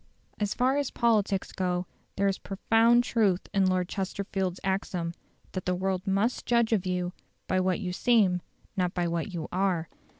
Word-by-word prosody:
As 210 -1 -1
far 260 +2 +2
as 285 -2 0
politics 210 -5 +1
go 180 -1 -1 0.3
there 200 0 +2
is 195 - 0
profound 225 +4 +3
truth 210 -7 +2
in 195 -2 +3
Lord 185 -1 +1
Chesterfield's 190 -1 -3
axiom, 185 -3 -1 0.4
that 185 - -4
"the 180 - +1
world 190 +1 -2
must 200 +5 0
judge 235 -1 +3
of 195 -4 +1
you 180 -1 -1 0.3
by 185 - +1
what 185 +1 +1
you 180 -4 -3
seem, 195 -5 +3 0.3
not 180 -1 0
by 175 -1 +1
what 170 +3 -2
you 170 -3 -4
are". 185 -4 0
190 Hz, 170 wpm, -28 LUFS, 180-210 Hz, 0.4 s, profound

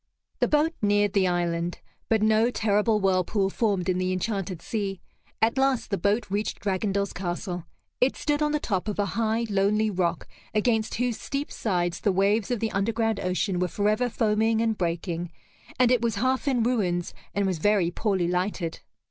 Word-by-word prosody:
The - - +3
boat 305 +2 +2
neared 205 -1 +2
the 195 -2 +3
island, 175 -1 -1 0.3
but 220 -2 +3
no 220 +2 +4
terrible 215 -1 +2
whirlpool 195 +1 +1
formed 200 -6 0
in 185 -1 +1
the 185 0 0
enchanted 185 -2 -2
sea. 195 -1 -3 0.4
At 230 +4 +2
last 270 -4 +1
the 200 - +1
boat 205 +3 +1
reached 205 +2 -2
Dragondel's 200 0 -1
castle. 175 -1 -4 0.3
It 255 +2 +3
stood 295 0 0
on 300 0 +2
the 300 - +1
top 195 -7 -2
of 210 - -2
a 205 - +1
high 225 0 0
lonely 210 +1 +2
rock 175 -3 -1 0.3
against 220 0 +1
whose 245 -1 -1
steep 280 +1 -4
sides 175 -5 -1
the 205 - +2
waves 200 +4 +2
of 245 -4 -1
the 225 -1 0
underground 225 +2 0
ocean 185 0 -1
were 180 - +1
forever 215 +6 +1
foaming 220 0 +1
and 225 -1 +1
breaking, 170 -1 -2 0.5
and 250 -1 +4
it 250 -2 +3
was 230 -2 0
half 260 +5 0
in 250 -4 +2
ruins 185 -8 0 0.2
and 200 0 +1
was 185 -4 -1
very 195 -1 +2
poorly 190 -2 0
lighted. 180 -1 -2
205 Hz, 180 wpm, -26 LUFS, 185-225 Hz, 0.5 s, no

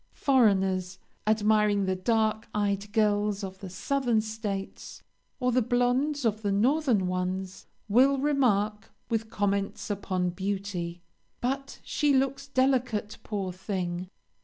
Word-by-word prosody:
Foreigners, 190 -8 +2 0.3
admiring 210 -2 +3
the 190 0 0
dark 220 +2 +1
eyed 205 0 -1
girls 210 -1 +1
of 190 0 -6
the 195 - -7
southern 245 +4 0
states 215 -3 -5 0.4
or 250 0 +1
the 250 +1 +3
blondes 245 +4 +1
of 215 -1 +1
the 205 -2 0
northern 240 0 +2
ones, 185 +1 -3 0.2
will 260 +6 +5
remark, 225 -7 +1 0.2
with 225 -1 -1
comments 200 -1 -1
upon 185 -3 -1
beauty: 190 -2 -4 0.4
"But 275 +2 -3
she 295 -1 +1
looks 275 +1 0
delicate, 255 -6 0
poor 195 -4 -3
thing! 185 -2 -4
210 Hz, 120 wpm, -28 LUFS, 195-245 Hz, 0.4 s, will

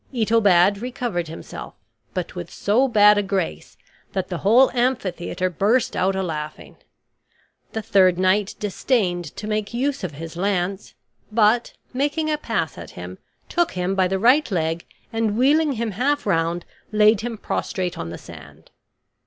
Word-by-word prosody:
Itobad 205 -5 +3
recovered 240 -9 -3
himself, 160 - -9 0.4
but - - -3
with - - -6
so 235 +7 +2
bad 210 -3 +6
a - - +2
grace 195 -3 -3 0.4
that 190 -2 -2
the 175 -3 -3
whole 240 +7 +5
amphitheater 200 -8 -1
burst 215 +8 +1
out 190 +1 +1
a 190 - -1
laughing. 155 -3 -6 1.0
The 220 - -3
third 185 -3 +4
knight 190 +2 +2
disdained 195 -4 0
to - - -6
make 215 +1 -2
use 275 0 -1
of 175 -5 -3
his 165 +3 -8
lance; 190 +1 -2 0.4
but, 220 +2 +3 0.2
making 295 +4 0
a 300 - -1
pass 190 - -2
at 85 - -9
him, 90 +1 -9 0.3
took 345 -1 0
him 180 +1 -1
by 190 -1 +2
the 190 +1 -1
right 250 +9 +4
leg 165 -3 -1 0.3
and, 225 -2 0
wheeling 290 +4 +3
him 230 -2 -2
half 275 +8 0
round, 170 -2 0 0.3
laid 215 0 +4
him 230 -1 -4
prostrate 185 -3 -3
on 85 - -5
the 85 - -6
sand. 75 -1 -14
200 Hz, 155 wpm, -22 LUFS, 175-235 Hz, 1.0 s, bad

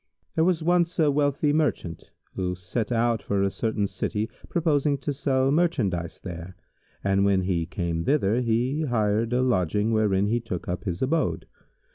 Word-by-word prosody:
There 160 - +2
was 170 -2 +2
once 175 +1 +2
a 155 -4 +4
wealthy 145 +1 +1
Merchant, 125 - -1 0.2
who 90 -1 -2
set 95 +6 -3
out 115 -1 +1
for 100 -1 0
a 100 - +1
certain 110 -2 -1
city 105 +2 -3 0.2
purposing 150 -4 +1
to 145 +2 -3
sell 135 -1 +1
merchandise 110 - 0
there, 90 0 -7 0.5
and 100 0 +2
when 100 -2 +3
he 85 -3 -1
came 85 -2 -2
thither, 125 -5 +2
he 125 +6 0
hired 110 -2 +1
him 125 - +2
a 130 - +2
lodging 105 -2 +1
wherein 105 -3 +2
he 115 +3 +1
took 100 -7 -6
up 90 +4 -4
his 90 +1 -2
abode. 130 - 0
115 Hz, 170 wpm, -26 LUFS, 95-145 Hz, 0.5 s, a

